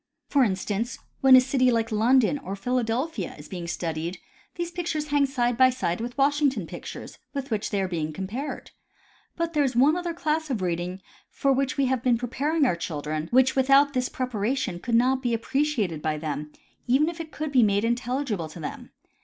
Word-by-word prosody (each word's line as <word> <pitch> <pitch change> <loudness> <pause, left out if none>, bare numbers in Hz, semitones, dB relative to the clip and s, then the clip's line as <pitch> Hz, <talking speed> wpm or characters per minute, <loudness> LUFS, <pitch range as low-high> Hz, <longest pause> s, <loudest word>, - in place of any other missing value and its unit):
For 280 -2 +4
instance, 210 +2 -1 0.2
when 265 -1 +8
a - - +10
city 255 0 +2
like 225 0 0
Lon 225 +5 +4
don 260 +4 +2
or 195 -4 -5
Philadelphia 240 - -2
is 150 - -11
being 175 -2 -6
studied, 165 +1 -3 0.4
these 345 0 -3
pictures 330 -4 -3
hang 285 -1 +3
side 245 -3 0
by 260 0 +7
side 230 -8 -2
with 240 +2 -5
Washington 275 - +2
pictures, - - -9 0.2
with 275 -2 -4
which 215 -1 -1
they 205 - -1
are - - -1 0.2
compared. 200 - -5 0.6
But 335 0 -2
there 295 -2 +3
is 265 -3 -1
one 280 +6 +5
other 350 -2 -3
class 315 -1 -1
of 250 -5 -1
reading 180 +2 -3 0.3
for 275 -1 +1
which 270 0 -1
we 275 - +3
have 260 -2 0
been 245 -2 +3
preparing 280 +6 0
our 180 - +2
children, 155 -2 -4
which 260 +1 +4
without 275 +2 +5
this 255 -1 0
preparation 250 -5 -2
could 235 +5 -1
not 255 +3 +3
be 240 -3 0
appreciated 230 - -1
by 155 0 -1
them, 150 -1 -4 0.4
even 270 +5 +4
if 340 0 -4
it 315 -1 -9
could 305 -1 -4
be 260 -3 +5
made 205 -1 +3
intelligible 240 - -1
to 160 - -10
them. 150 - -7
250 Hz, 195 wpm, -26 LUFS, 200-275 Hz, 0.6 s, a